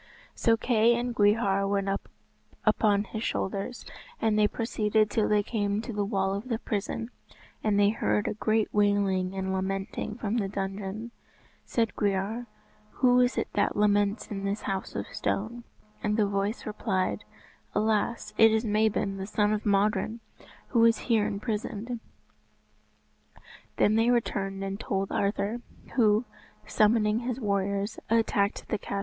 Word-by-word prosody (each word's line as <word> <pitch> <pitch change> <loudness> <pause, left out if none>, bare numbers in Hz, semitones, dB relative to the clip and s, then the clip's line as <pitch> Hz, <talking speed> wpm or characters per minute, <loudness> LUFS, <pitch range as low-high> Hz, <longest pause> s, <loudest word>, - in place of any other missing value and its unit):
So 225 -1 +2
Kay 230 0 +3
and 240 +1 -2
Gwrhyr 205 -2 +3
went 200 -1 0 0.8
upon 210 -1 +3
his 215 +1 -6
shoulders, 200 +5 -3 0.3
and 220 -1 +2
they 210 0 +4
proceeded 215 -1 0
till 220 - +1
they 210 -1 +3
came 205 -2 -1
to 230 +1 -5
the 205 0 0
wall 195 -2 0
of 205 +6 -5
the 230 - 0
prison, 225 +2 -3 0.5
and 210 -2 +2
they 200 0 +5
heard 105 - 0
a - - 0
great 215 0 0
wailing 200 -2 +2
and 190 0 -2
lamenting 195 +2 -3
from 225 0 -1
the 205 -4 0
dungeon. 195 +3 -4 0.5
Said 225 -2 0
Gwrhyr, 205 +4 -1 0.5
"Who 250 -1 +4
is 250 0 +2
it - - -1
that 205 - +1
laments 205 0 +2
in 195 -1 -4
this 200 +1 -2
house 190 -1 -3
of - - -2
stone?" 235 +4 -2 0.4
And 210 0 0
the 215 - +4
voice 200 +2 -2
replied, 185 - -1 0.5
"Alas, 215 +2 0
it 225 - +8
is 220 +2 +1
Mabon, 210 -2 +1
the 190 0 -5
son 210 0 +1
of 215 0 -2
Modron, 205 +2 +1 0.5
who 230 -3 +3
is 230 -1 +5
here 225 -4 +1
imprisoned!" 215 +2 -3 1.8
Then 215 +1 +3
they 225 +1 +3
returned 195 -5 0
and 195 +1 -4
told 195 -2 -2
Arthur, 205 +3 -1 0.3
who, 220 -1 +3 0.4
summoning 215 0 +3
his 250 +1 -3
warriors 200 -1 -1
attacked 220 -2 +1
the 215 - -1
castle. 200 - -4
210 Hz, 150 wpm, -28 LUFS, 200-225 Hz, 1.8 s, it